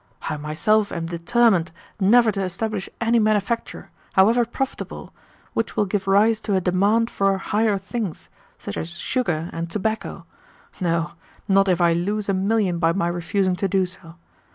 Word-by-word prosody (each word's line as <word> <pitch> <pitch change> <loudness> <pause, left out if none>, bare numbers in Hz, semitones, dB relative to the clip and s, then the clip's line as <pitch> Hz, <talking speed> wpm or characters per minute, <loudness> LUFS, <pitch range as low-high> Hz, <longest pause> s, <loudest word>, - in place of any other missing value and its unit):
I - - -2
myself 165 +9 +1
am 170 -1 -3
determined 175 +2 +2 0.3
never 220 +3 +5
to 195 -1 -3
establish 195 +2 -3
any 230 0 +2
manufacture, 215 +1 -1 0.2
however 225 +5 +4
profitable, 265 +3 -5 0.4
which 225 - -2
will 210 - +3
give 195 0 -2
rise 210 +3 +4
to 210 -3 -1
a - - +3
demand 200 +6 +2
for 195 -1 +1
'higher 210 +1 +1
things,' 195 -2 -5 0.3
such - - -7
as 160 - -4
sugar 175 -10 -2
and 165 0 -4
tobacco 205 -2 -3 0.5
no 170 -1 0 0.4
not 195 0 +4
if 180 -2 +2
I 170 -1 +4
lose 200 +5 -1
a 195 - +1
million 195 -2 +1
by 165 0 +2
my 170 -2 0
refusing 180 +2 0
to 195 - 0
do 190 0 +2
so. 170 -2 -9
195 Hz, 160 wpm, -22 LUFS, 175-215 Hz, 0.5 s, never